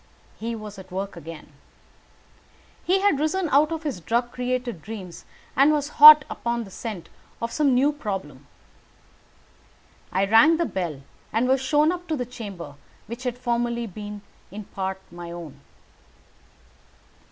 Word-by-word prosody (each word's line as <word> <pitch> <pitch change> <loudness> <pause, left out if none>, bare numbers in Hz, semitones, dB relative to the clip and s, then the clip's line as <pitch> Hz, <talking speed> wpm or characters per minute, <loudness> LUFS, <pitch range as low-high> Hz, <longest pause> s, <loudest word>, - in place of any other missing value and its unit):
He 230 +1 -3
was 210 -2 -9
at 185 0 -13
work 195 +2 -4
again. 165 -2 -10 1.3
He 380 +2 +2
had 400 -8 +3
risen 330 +4 0
out 295 +3 +4
of 325 0 -4
his 280 - -3
drug 235 +7 -1
created 250 -6 -3
dreams, 190 -3 -9 0.3
and 275 +3 +5
was 295 -1 0
hot 300 -1 +12
upon 235 0 -3
the 195 - -12
scent 210 -4 -6 0.3
of 230 0 -3
some 280 -3 +2
new 280 +4 +3
problem. 190 - -6 1.6
I 190 +2 +1
rang 225 +11 +6
the 340 - +1
bell, 165 - -4 0.3
and 230 +3 +1
was 265 0 +2
shown 295 +4 +3
up 355 0 -6
to 315 - -1
the 250 - -2
chamber 200 - -8 0.3
which 235 +2 -8
had 245 -1 -2
formerly 235 -1 -1
been 205 0 -8 0.3
in 210 +2 -8
part 190 -1 -4
my 175 0 -8
own. 165 -5 -9
235 Hz, 150 wpm, -24 LUFS, 190-280 Hz, 1.6 s, hot